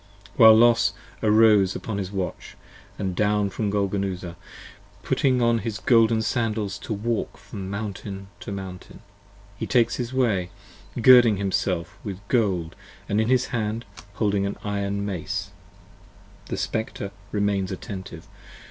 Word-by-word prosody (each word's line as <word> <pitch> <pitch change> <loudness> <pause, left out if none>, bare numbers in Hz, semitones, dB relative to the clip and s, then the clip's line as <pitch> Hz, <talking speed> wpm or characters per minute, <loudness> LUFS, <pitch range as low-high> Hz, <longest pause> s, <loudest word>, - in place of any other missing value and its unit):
75 100 - -22
While 110 -1 +10
Los 115 -3 +4 0.3
arose 105 -3 +5
upon 105 -3 -4
his 95 -1 -4
Watch, 95 -3 -5 0.4
and 95 -3 -3
down 105 0 +1
from 105 0 -2
Golgonooza, 95 -3 -2 0.7
Putting 130 -3 +2
on 115 0 +3
his 110 -2 -4
golden 115 -1 +3
sandals 110 -4 -1
to - - -8
walk 110 +2 -2
from 100 -2 -8
mountain 100 -1 -5
to - - -7
mountain, 95 -2 -8 0.5
He - - -4
takes 120 -2 +2
his 120 -1 -3
way, 110 -9 +1 0.5
girding 120 -3 +7
himself 95 -3 -2
with 100 0 -7
gold 95 -9 0 0.2
& - - -24
in 105 - +1
his 125 +3 +2
hand 110 0 -2 0.3
Holding 100 -2 0
his 100 - -3
iron 100 0 -2
mace: 90 0 -4 1.0
The - - -4
Spectre 110 -3 -3 0.2
remains 100 -2 0
attentive. 95 -3 -7
100 Hz, 135 wpm, -24 LUFS, 95-110 Hz, 1.0 s, While